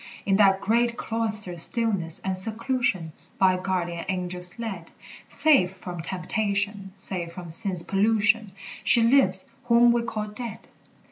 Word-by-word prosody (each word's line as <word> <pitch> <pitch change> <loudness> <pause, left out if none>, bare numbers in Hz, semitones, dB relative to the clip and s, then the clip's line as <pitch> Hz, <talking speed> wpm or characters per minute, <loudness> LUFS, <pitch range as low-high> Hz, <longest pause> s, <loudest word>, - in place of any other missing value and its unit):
In 195 -1 +1
that 195 -2 +3
great 235 +2 0
cloister's 215 -6 0
stillness 195 -7 +3
and 190 -1 -2
seclusion, 220 - -2 0.2
By 185 -1 +2
guardian 175 -2 -4
angels 180 0 -1
led, 195 -8 -7 0.4
Safe 270 -13 +2
from 180 -2 -8
temptation, 200 +2 -3
safe 180 -3 +1
from 180 -2 -10
sin's 180 0 +4
pollution, 210 +1 0 0.3
She 235 - +4
lives 230 -7 +4 0.2
whom 240 0 +4
we 235 0 0
call 220 -2 -5
dead. 230 +2 -9
195 Hz, 130 wpm, -24 LUFS, 180-225 Hz, 0.4 s, sin's